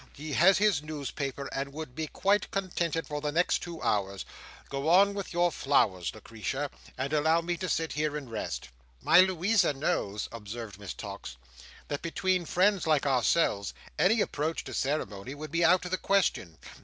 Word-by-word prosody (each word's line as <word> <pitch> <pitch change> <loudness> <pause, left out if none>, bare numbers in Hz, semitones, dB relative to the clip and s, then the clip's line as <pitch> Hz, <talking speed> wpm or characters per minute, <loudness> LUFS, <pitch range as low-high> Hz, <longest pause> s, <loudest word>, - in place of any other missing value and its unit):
He 150 +1 -6
has 185 +6 +6
his 205 -7 +3
newspaper, 140 -2 -4
and 140 0 -3
would 155 -4 -7
be 155 +3 -3
quite 200 +5 +1
contented 170 -4 -1
for 150 -1 -4
the 150 0 -1
next 175 +4 +2
two 170 -2 -7
hours. 100 -1 0 0.4
Go 140 +3 -2
on 200 +4 +6
with 200 -1 -5
your 175 0 +2
flowers, 110 - +1
Lucretia, 115 +6 -4 0.3
and 135 +3 -2
allow 160 +2 +3
me 175 +1 -2
to 185 0 -3
sit 160 0 -1
here 150 0 -1
and 140 -3 -7
rest." 105 - -4 0.3
"My 170 - +7
Louisa 185 -1 +2
knows," 105 -7 -1
observed 110 -2 -7
Miss 100 -4 -6
Tox, 60 -1 -8 0.5
"that 145 - -3
between 180 +1 0
friends 190 +2 +2
like 155 -3 +3
ourselves, 125 -5 +2 0.2
any 200 +7 +4
approach 155 -1 -1
to - - -8
ceremony 130 -4 -2
would 155 0 -8
be 170 +1 +1
out 180 +2 +4
of 180 - -5
the 185 - 0
question. 185 - +1
155 Hz, 175 wpm, -29 LUFS, 130-175 Hz, 0.5 s, My